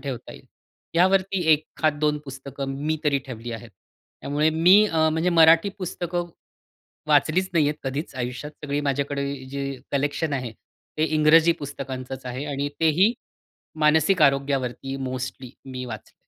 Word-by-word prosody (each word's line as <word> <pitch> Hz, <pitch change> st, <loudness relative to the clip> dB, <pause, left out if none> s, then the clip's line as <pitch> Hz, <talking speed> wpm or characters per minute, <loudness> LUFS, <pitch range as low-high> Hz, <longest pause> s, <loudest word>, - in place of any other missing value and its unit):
ठेवता 135 Hz, -4 st, -6 dB
येईल. -, -, -15 dB, 0.5 s
यावरती 185 Hz, +1 st, +3 dB
एखाद 155 Hz, 0 st, 0 dB
दोन 150 Hz, -1 st, +1 dB
पुस्तकं 135 Hz, 0 st, -6 dB
मी 155 Hz, 0 st, +1 dB
तरी 145 Hz, -2 st, +2 dB
ठेवली 120 Hz, -2 st, -7 dB
आहेत. 115 Hz, 0 st, -8 dB, 0.5 s
त्यामुळे 150 Hz, +2 st, +1 dB
मी 180 Hz, +6 st, +6 dB
अ, 160 Hz, -4 st, +2 dB
म्हणजे 160 Hz, +3 st, 0 dB
मराठी 165 Hz, +2 st, +6 dB
पुस्तकं 175 Hz, -1 st, -3 dB, 0.8 s
वाचलीच 155 Hz, +5 st, +3 dB
नाहीयेत 150 Hz, -3 st, +2 dB
कधीच 140 Hz, +4 st, -4 dB
आयुष्यात. 125 Hz, +3 st, -4 dB
सगळी 145 Hz, 0 st, -1 dB
माझ्याकडे 140 Hz, 0 st, -1 dB, 0.2 s
जी 140 Hz, 0 st, -4 dB, 0.2 s
कलेक्शन 145 Hz, +2 st, -1 dB
आहे, 125 Hz, -4 st, -3 dB, 0.5 s
ते 155 Hz, -, +3 dB
इंग्रजी 160 Hz, +2 st, +5 dB
पुस्तकांचंच 135 Hz, -2 st, -6 dB
आहे 125 Hz, +3 st, -4 dB
आणि 140 Hz, 0 st, -2 dB
तेही 170 Hz, +8 st, +4 dB, 0.7 s
मानसिक 160 Hz, +4 st, +4 dB
आरोग्यावरती 135 Hz, -2 st, +1 dB
मोस्टली 130 Hz, -1 st, -5 dB
मी 130 Hz, -1 st, -6 dB
वाचलंय. 110 Hz, -3 st, -9 dB
145 Hz, 135 wpm, -24 LUFS, 135-160 Hz, 0.8 s, मी